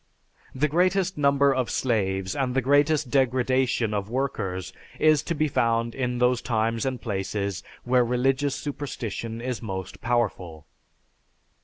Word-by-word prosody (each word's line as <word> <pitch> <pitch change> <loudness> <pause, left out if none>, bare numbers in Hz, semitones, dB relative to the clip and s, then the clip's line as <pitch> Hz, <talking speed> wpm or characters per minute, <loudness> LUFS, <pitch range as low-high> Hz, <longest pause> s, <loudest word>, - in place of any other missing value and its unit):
The 145 +3 +2
greatest 185 +4 +1
number 140 -1 +3
of 130 -2 -1
slaves 95 -6 -1
and 130 -3 -1
the 135 - +3
greatest 145 0 +3
degradation 130 -3 +1
of 100 0 -2
workers 115 -8 -3 0.3
is 155 -2 +4
to 170 - -3
be 155 +1 +1
found 115 -3 +1
in 125 -2 -2
those 125 0 +2
times 115 +1 0
and 130 -2 -2
places 100 -2 -3 0.2
where 125 0 +3
religious 130 +3 +1
superstition 115 -6 -5
is 125 -1 -3
most 95 -4 -6
powerful. 95 -10 -1
125 Hz, 135 wpm, -25 LUFS, 110-140 Hz, 0.3 s, is